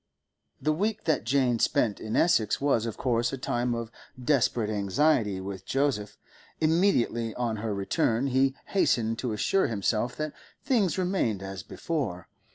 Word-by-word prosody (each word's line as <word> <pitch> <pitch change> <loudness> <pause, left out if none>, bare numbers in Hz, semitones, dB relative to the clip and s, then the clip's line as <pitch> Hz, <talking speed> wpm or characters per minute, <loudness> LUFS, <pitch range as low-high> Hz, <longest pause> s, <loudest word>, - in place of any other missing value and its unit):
The 155 - +1
week 210 +6 -1
that 155 -7 0
Jane 125 -2 +2
spent 110 -2 +1
in 110 0 -4
Essex 110 - +3
was 125 -5 +1
of 115 - -5
course 120 -2 +1
a 135 - -4
time 120 -1 -1
of 115 -1 -5 0.3
desperate 120 -4 +1
anxiety 105 +1 +1
with 95 0 -6
Joseph; 135 -7 -1 0.4
immediately 155 - +2
on 120 -3 -1
her 110 +1 -3
return 110 +5 0
he 135 0 +2
hastened 115 - +1
to 125 - -2
assure 190 - +1
himself 110 +2 -1
that 155 -1 -3 0.3
things 220 - +1
remained 180 - 0
as 95 -1 -6
before. 110 - -4
120 Hz, 150 wpm, -28 LUFS, 110-150 Hz, 0.4 s, Essex